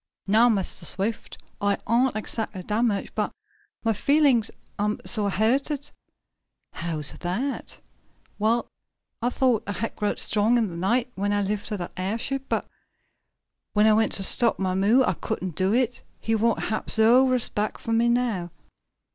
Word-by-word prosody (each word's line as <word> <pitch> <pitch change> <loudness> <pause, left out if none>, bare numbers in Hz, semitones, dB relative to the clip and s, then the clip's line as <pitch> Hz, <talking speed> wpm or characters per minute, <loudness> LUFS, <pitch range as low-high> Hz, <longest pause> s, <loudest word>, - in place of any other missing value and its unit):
"No, 220 +5 +4
Mistah 195 -4 -2
Swift, 210 +7 -1 0.2
I 200 0 +1
ain't 245 +3 +2
exactly 215 -3 -3
damaged, 210 0 -1
but - - -1 0.5
mah 225 - +3
feelin's 275 -2 +3 0.3
am 210 +1 0
suah 210 -3 +5
hurted." 270 +8 0 0.8
"How's 155 -4 -1
that?" 225 +11 -3 0.6
"Well, 225 +3 +1 0.6
I 240 - +1
thought 250 -3 +1
I 205 - -2
had 225 +5 -4
growed 210 -1 -1
strong 220 +3 +2
in 225 -4 +1
de 170 - -8
night, 235 +8 0
when 200 +1 -2
I 205 0 +1
lifted 210 +1 -3
dat 175 -2 -6
airship, 230 +8 -2
but - - -1 1.1
when 210 0 +4
I 220 - +6
went 220 +1 +2
to 195 - 0
stop 235 +4 +3
mah 190 -1 -1
mule 215 +8 +3
I - - +1
couldn't 180 0 -4
do 185 +4 +1
it. 245 +1 0 0.2
He 225 - -1
won't 225 +1 +2 0.2
hab 215 - -3
no 240 +4 +5
respect 225 -4 -1
fo' 230 - -4
me 230 +1 +3
now." 235 -8 0
220 Hz, 155 wpm, -25 LUFS, 200-240 Hz, 1.1 s, I